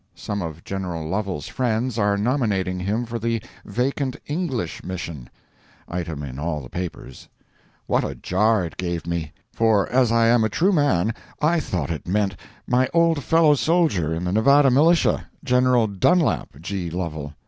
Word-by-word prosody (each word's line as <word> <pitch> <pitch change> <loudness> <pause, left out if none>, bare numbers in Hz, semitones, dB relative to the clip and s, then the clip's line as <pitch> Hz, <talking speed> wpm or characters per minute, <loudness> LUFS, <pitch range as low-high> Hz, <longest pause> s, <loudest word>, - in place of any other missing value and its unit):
Some 100 -1 -4
of 80 -1 -6
General 90 -5 -4
Lovel's 95 -3 -3
friends 120 -1 -1
are 100 -1 +2
nominating 100 -6 0
him 105 +6 -1
for 115 0 -4
the 115 +1 -1 0.3
vacant 130 +4 -1
English 145 -6 -3
mission. 85 -7 -6 0.6
[Item 85 -4 -4
in 65 -1 -7
all 75 0 -2
the 60 - -12
papers.] 85 -7 -7 0.6
What - - +1
a - - -4
jar 105 +1 +1
it 80 - -9
gave 85 -2 -3
me! 85 -3 -3 0.2
For 110 -3 +3
as 125 -2 +3
I 115 0 +4
am 115 0 +4
a 110 - +1
true 185 - +2
man, 125 - +2 0.3
I 165 +3 +2
thought 85 - -3
it 80 -1 -5
meant 100 +1 0 0.3
my 125 +1 +2
old 165 -4 +3
fellow 165 -2 +5
soldier 150 - +1
in 80 +2 -2
the 90 - -1
Nevada 135 +7 +5
militia, 160 +6 +3 0.2
General 125 -2 +3
Dunlap 110 - +1
G. 95 -1 -3
Lovel. 80 -4 -4
105 Hz, 160 wpm, -23 LUFS, 85-130 Hz, 0.6 s, fellow